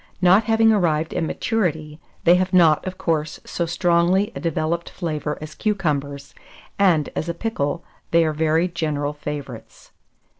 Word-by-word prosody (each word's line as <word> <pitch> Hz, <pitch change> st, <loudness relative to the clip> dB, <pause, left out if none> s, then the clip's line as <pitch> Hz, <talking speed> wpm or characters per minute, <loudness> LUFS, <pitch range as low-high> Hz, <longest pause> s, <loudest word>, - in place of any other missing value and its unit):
Not 190 Hz, +4 st, +5 dB
having 225 Hz, 0 st, +4 dB
arrived 165 Hz, -5 st, 0 dB
at -, -, -1 dB
maturity, 160 Hz, -4 st, -2 dB, 0.2 s
they 170 Hz, -, +6 dB
have 185 Hz, +1 st, +1 dB
not, 165 Hz, -4 st, +5 dB
of 185 Hz, 0 st, -5 dB
course, 155 Hz, -2 st, -2 dB
so 170 Hz, -, -3 dB
strongly 175 Hz, +3 st, +2 dB
a -, -, -4 dB
developed 165 Hz, +1 st, -2 dB
flavour 155 Hz, -4 st, -4 dB
as 155 Hz, 0 st, -8 dB
cucumbers, 145 Hz, -10 st, -2 dB, 0.5 s
and, 175 Hz, -7 st, +3 dB
as 170 Hz, -, -3 dB
a 170 Hz, -, -3 dB
pickle, 170 Hz, -6 st, -2 dB, 0.3 s
they 165 Hz, 0 st, +4 dB
are 155 Hz, -, 0 dB
very 160 Hz, +3 st, +1 dB
general 150 Hz, -4 st, -2 dB
favourites. 145 Hz, -5 st, -8 dB
165 Hz, 150 wpm, -22 LUFS, 150-180 Hz, 0.5 s, they